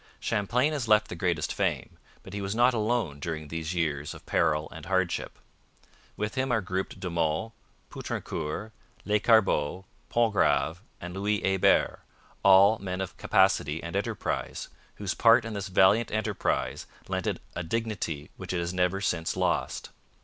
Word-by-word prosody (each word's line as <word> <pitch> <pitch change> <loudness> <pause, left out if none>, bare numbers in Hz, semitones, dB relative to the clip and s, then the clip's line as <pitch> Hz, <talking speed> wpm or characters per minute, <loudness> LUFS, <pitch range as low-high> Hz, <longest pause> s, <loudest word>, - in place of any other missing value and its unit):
Champlain 125 +9 +1
has 135 -6 -2
left 105 0 +4
the - - -5
greatest 85 -2 -1
fame, - - -2 0.2
but 95 - -11
he 100 - -3
was 100 +2 -3
not 120 +2 +4
alone 110 -9 0
during 80 -1 -5
these 80 +2 -4
years 75 -4 -1
of - - -13
peril 75 -2 +1
and 80 -1 -10
hardship. 95 -2 -1 0.8
With 105 +1 -2
him 130 0 -1
are 115 - +3
grouped 95 -1 -4
De 95 - -4
Monts, 85 +5 -1 0.4
Poutrincourt, 105 +9 -4 0.3
Lescarbot, 105 -6 +3 0.3
Pontgrave, 105 -6 +2 0.2
and 90 0 -7
Louis 100 +2 0
Hebert, 95 -1 +3 0.4
all 100 +3 +6
men 90 -1 -4
of 95 -2 -4
capacity 75 +2 +2
and 85 0 -5
enterprise, - - -3 0.3
whose 100 -3 -3
part 115 0 +5
in 115 - -5
this 100 0 -4
valiant 100 +4 +4
enterprise 110 -1 -1 0.2
lent - - -2
it - - -1 0.2
a - - -2
dignity 85 -6 -3
which - - -5
it 90 - 0
has 85 +1 -2
never 90 +1 +1
since 85 -4 -1
lost. - - -1
95 Hz, 155 wpm, -28 LUFS, 85-110 Hz, 0.8 s, all